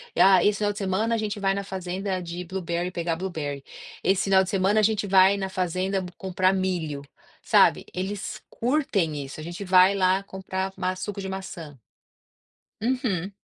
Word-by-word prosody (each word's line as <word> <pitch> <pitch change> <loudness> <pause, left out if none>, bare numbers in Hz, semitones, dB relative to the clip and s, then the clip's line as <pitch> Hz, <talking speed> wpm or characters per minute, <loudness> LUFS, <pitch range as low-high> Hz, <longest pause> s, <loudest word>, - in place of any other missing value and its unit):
"Ah 190 -1 +6
esse 205 0 +2
final 205 -1 +1
de 205 - -9
semana 210 +3 0
a - - 0
gente 210 -1 -3
vai 195 0 +1
na 200 - -3
fazenda 190 0 -3
de 175 +1 -6
blueberry, 175 -1 -3
pegar 170 -2 -2
blueberry. 155 -6 -4 0.4
Esse 190 0 +2
final 190 -1 +5
de 190 - -5
semana 195 +2 +2
a - - +2
gente 210 -1 +1
vai 190 +1 +5
na 190 -1 -3
fazenda 185 +1 -1
p 180 - -8
comprar 185 0 +1
milho", 175 -7 -2 0.4
sabe, - - +4
eles 195 +2 -4
curtem 205 - 0
isso. 135 +3 -9
"A - - -6
gente 175 +4 -6
vai 185 +1 +5
lá 190 0 +3
comprar 190 0 -4
ma 185 0 -1
suco 200 +1 -5
de 195 - -5
maçã" 175 -6 -7 1.1
Uhum. 225 - -1
190 Hz, 180 wpm, -25 LUFS, 180-200 Hz, 1.1 s, Ah